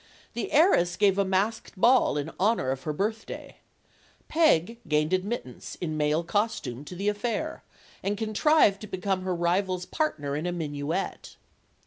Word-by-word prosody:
The 235 - -4
heiress 280 - +4
gave 200 -1 +3
a - - +4
masked 195 +2 -1
ball 245 - +4
in 145 +2 -3
honor 195 - +2
of 135 0 -3
her 155 - 0
birthday. 215 +8 -4 0.7
Peg 235 - +3
gained 150 +2 +1
admittance, 185 - -3
in 160 -3 -3
male 150 +2 +1
costume, 205 - -2
to 180 - -8
the 200 +3 -3
affair, 240 +9 -2 0.4
and 205 +1 -1
contrived 215 0 +3
to 215 - -7
become 190 0 -2
her 185 -1 -2
rival's 180 +1 0
partner 145 - -2
in 155 +4 -2
a - - 0
minuet. 155 +1 -3
190 Hz, 150 wpm, -27 LUFS, 160-220 Hz, 0.7 s, heiress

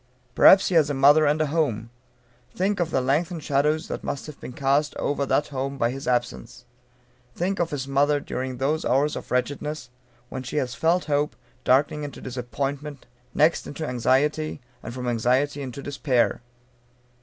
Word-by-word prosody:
Perhaps 190 - +7
he - - -2
has 155 -4 +4
a 145 - -1
mother, 145 +3 +6
and 150 +2 +2
a - - +3
home. 140 -8 -1 0.6
Think 195 +2 0
of 170 -2 0
the 130 - +1
lengthened 155 +5 0
shadow 145 +2 +2
that 160 - -6
must 140 - -4
have 150 -2 -10
been - - -8
cast 140 +3 0
over 140 -1 -1
that 145 - +1
home 135 0 -3
by 115 -2 +1
his 135 +3 -7
absence. 125 0 -2 0.7
Think 190 +3 -1
of 170 -1 +1
his 135 -2 -4
mother, 145 +2 +2
during 130 -2 -5
those 145 +5 0
hours 140 +4 +1
of - - -7
wretchedness, 140 +1 -2 0.4
when 130 - -5
she 130 - -7
has 125 -4 -1
felt 170 +5 +1
hope 150 0 0 0.3
darkening 140 +3 +2
into 145 -1 -7
disappointment, 135 +3 -5 0.3
next 155 +3 +3
into 155 +1 -5
anxiety, 140 +6 +1 0.2
and - - -7
from 125 0 -5
anxiety 125 +5 +1
into 135 0 -7
despair. 135 -5 0
140 Hz, 170 wpm, -24 LUFS, 130-150 Hz, 0.7 s, Perhaps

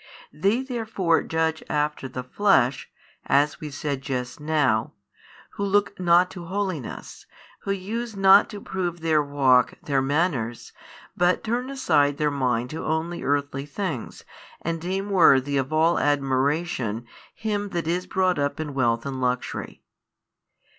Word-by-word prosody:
They 205 +10 +1
therefore 220 -9 0
judge 160 0 -1
after 150 -2 -1
the 130 0 -5
flesh, 130 -4 +2 0.4
as 145 +1 +2
we 155 - -5
said 140 0 -3
just 125 -1 -4
now, 145 -8 +1 0.6
who 200 - -5
look 200 0 +1
not 175 0 +4
to 175 -2 -8
holiness, 185 - -5 0.4
who 200 - -1
use 215 +4 -4
not 195 +1 +6
to 210 - -7
prove 175 -4 -4
their 160 -2 +3
walk, 140 -3 +3
their 140 -2 +1
manners, 135 -5 -1 0.4
but 175 +1 +2
turn 245 +3 -2
aside 145 - +2
their 150 -1 +1
mind 125 -3 -1
to 155 - -5
only 160 +2 -2
earthly 140 0 -1
things 150 - -5 0.4
and 165 0 -2
deem 190 +3 -3
worthy 145 -7 +5
of 135 +1 -1
all 160 +2 +3
admiration 135 -4 0 0.3
him 205 -2 -2
that 170 -3 -3
is 180 +2 -1
brought 185 -2 +1
up 140 +1 -1
in 150 -2 -4
wealth 120 -3 +1
and 135 -2 -4
luxury. 125 -1 -3
155 Hz, 140 wpm, -24 LUFS, 135-185 Hz, 0.6 s, not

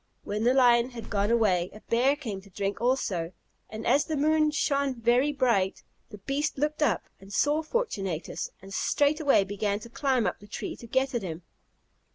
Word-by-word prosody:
When 210 +2 -2
the 250 - +5
lion 240 -2 +5
had 240 -3 -9
gone 205 -1 +1
away, 195 -7 +2
a 215 - -12
bear 255 +5 +2
came 220 -10 -6
to 200 - -17
drink 195 +2 -3
also; 195 -9 0 0.4
and, 220 +1 -7
as 290 +1 +3
the 310 - -2
moon 305 +1 +3
shone 280 -3 0
very 245 +5 +3
bright, 235 -9 +1 0.3
the 210 - -10
beast 275 +9 -2
looked 300 +2 -1
up, 300 - +2 0.2
and 195 +1 -14
saw 295 +8 +2
Fortunatus, 200 - -3
and 195 0 -10
straightway 285 -4 +3
began 205 +1 -2
to 235 - -10
climb 260 -3 +1
up - - -2
the 205 - -14
tree - - -5
to 235 - -11
get 265 +3 0
at 240 - -1
him. 170 -2 -6
235 Hz, 190 wpm, -28 LUFS, 200-280 Hz, 0.4 s, the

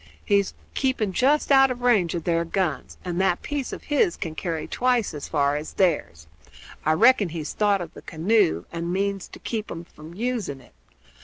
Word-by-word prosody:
He's 200 -2 +2 0.2
keeping 260 -7 0
just 280 +9 +2
out 270 -1 +7
of 250 -1 -4
range 210 -9 +3
of 170 - -3
their 170 -1 +1
guns, 170 -4 -2
and 180 0 -1
that 190 -2 +1
piece 290 -3 -3
of - - -7
his 340 +5 +1
can 165 -5 -4
carry 165 -1 -3
twice 245 -6 +1
as 145 -2 -6
far 145 -2 +1
as 150 +1 -5
theirs. 150 - 0 0.6
I 155 - +3
reckon 205 +2 +5
he's 160 -2 -5
thought 205 -2 +2
of 170 -1 -7
the - - -11
canoe, 160 - +1
and 170 +1 -3
means 195 0 -1
to - - -12
keep 220 -2 -4
'em 165 - -6
from 160 0 -13
using 225 - -2
it. 125 - -20
185 Hz, 190 wpm, -24 LUFS, 160-235 Hz, 0.6 s, out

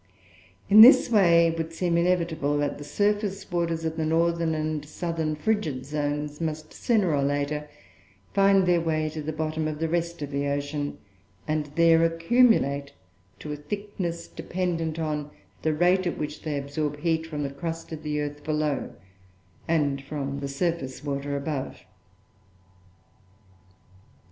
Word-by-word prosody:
In 210 +2 +9
this 245 +1 +9
way, 170 -6 +6
it 165 0 0
would 165 0 -3
seem 170 0 0
inevitable 170 -4 +1
that 145 0 -1
the - - -7
surface 205 +5 -1
waters 165 -2 -1
of 160 0 -2
the 160 - 0
northern 165 0 +1
and 155 -1 -2
southern 160 0 -3
frigid 155 -7 -1
zones 145 +1 -3
must, 155 -1 -4
sooner 210 -9 +1
or 140 - +1
later, 145 +1 -1 0.6
find 195 -1 +4
their 175 -1 +3
way 155 -1 0
to 155 0 -6
the 155 +1 -3
bottom 155 0 -2
of 155 -1 -3
the 165 +1 -1
rest 170 -1 -2
of 145 - -6
the 140 0 -1
ocean; 145 +1 -2 0.5
and 155 -1 -1
there 165 0 +5
accumulate 165 - +3 0.4
to 150 - -7
a - - -2
thickness 175 0 -5
dependent 170 -3 -3
on 150 -2 -2 0.3
the 160 - +1
rate 180 +4 +2
at 175 - -2
which 150 0 -5
they 150 -2 -3
absorb 145 +1 -3
heat 160 -1 0
from 150 -2 -4
the 140 - -3
crust 165 +4 -5
of 155 -1 -6
the 150 -1 -2
earth 145 0 -5
below, 150 -2 -1 0.7
and 145 -4 +1
from 140 -1 -4
the 140 - -4
surface 140 -2 -2
water 140 0 -2
above. 140 -1 -4
155 Hz, 155 wpm, -26 LUFS, 145-170 Hz, 0.7 s, In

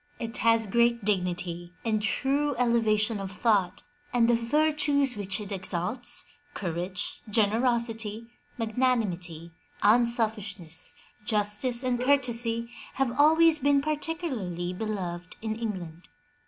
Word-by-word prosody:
It 230 -1 -4
has 230 0 +3
great 235 +1 +2
dignity 180 -3 -2
and 215 -2 +1
true 275 +7 0
elevation 225 -3 +2
of 195 -1 -5
thought, 205 -3 +1 0.3
and 235 -1 +3
the 240 - +4
virtues 285 +2 +2
which 200 -1 -1
it 205 -1 -7
exalts 190 +5 -1 0.2
— 290 0 -34
courage, 180 0 -4
generosity, 225 0 0 0.3
magnanimity, 210 -9 -1 0.3
unselfishness, 215 - +1 0.3
justice 210 +4 0
and 250 -1 0
courtesy, 240 -4 +1 0.3
have 270 -2 +1
always 320 +1 +6
been 285 0 +3
particularly 275 - -3
beloved 185 -4 -4
in 220 0 -3
England. 185 -7 -6
225 Hz, 110 wpm, -28 LUFS, 195-250 Hz, 0.3 s, always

